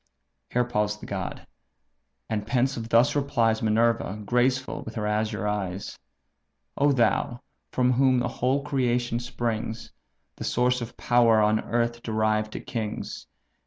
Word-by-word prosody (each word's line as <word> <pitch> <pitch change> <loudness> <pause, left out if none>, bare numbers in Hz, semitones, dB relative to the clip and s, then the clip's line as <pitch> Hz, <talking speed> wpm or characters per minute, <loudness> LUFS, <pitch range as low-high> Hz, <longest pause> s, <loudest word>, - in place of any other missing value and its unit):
Here 125 - +2
paused 105 -3 -1
the - - -9
god; 95 -2 -5 0.8
and 105 -1 -3
pensive 120 -2 0
thus 115 +4 +4
replies 115 -6 +1
Minerva, 110 -1 +1
graceful 125 +3 +1
with 115 - -8
her 105 -2 -2
azure 105 -1 -1
eyes: 100 -2 -3 0.8
"O 145 +1 +3
thou! 120 -1 +1 0.3
from 125 0 +2
whom 130 0 +4
the 125 0 +1
whole 130 +3 0
creation 125 -4 0
springs, 115 -2 -3 0.5
The - - -6
source 125 +1 +1
of 120 0 -7
power 120 -2 +4
on 105 0 +3
earth 120 0 -1
derived 110 -1 0
to - - -4
kings! 110 -3 -5
115 Hz, 135 wpm, -26 LUFS, 110-125 Hz, 0.8 s, thus